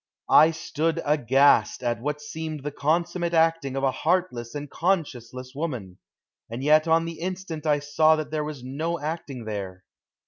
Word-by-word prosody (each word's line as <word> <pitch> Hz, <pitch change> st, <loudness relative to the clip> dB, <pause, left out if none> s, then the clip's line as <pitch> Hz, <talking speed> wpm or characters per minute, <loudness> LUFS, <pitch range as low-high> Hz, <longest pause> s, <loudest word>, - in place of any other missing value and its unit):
I 155 Hz, -, +8 dB
stood 160 Hz, 0 st, -2 dB
aghast 140 Hz, -2 st, +3 dB
at 120 Hz, -1 st, -1 dB
what 150 Hz, +2 st, -3 dB
seemed 155 Hz, -1 st, -6 dB
the 145 Hz, -, -3 dB
consummate 170 Hz, +4 st, 0 dB
acting 165 Hz, -4 st, +2 dB
of 135 Hz, -, -2 dB
a 135 Hz, -, +3 dB
heartless 150 Hz, -6 st, -1 dB
and 145 Hz, 0 st, -4 dB
conscienceless 130 Hz, -8 st, -2 dB
woman, 125 Hz, -, -5 dB, 0.5 s
and 120 Hz, +4 st, -5 dB
yet 155 Hz, +2 st, +4 dB
on 165 Hz, +1 st, +3 dB
the 165 Hz, -1 st, -6 dB
instant 180 Hz, -3 st, -5 dB
I 150 Hz, -1 st, +4 dB
saw 150 Hz, +2 st, +3 dB
that 155 Hz, -1 st, -5 dB
there 155 Hz, -1 st, -1 dB
was 150 Hz, -4 st, -6 dB
no 160 Hz, +6 st, -3 dB
acting 145 Hz, -5 st, -5 dB
there. 95 Hz, -3 st, -5 dB
150 Hz, 165 wpm, -25 LUFS, 130-165 Hz, 0.5 s, I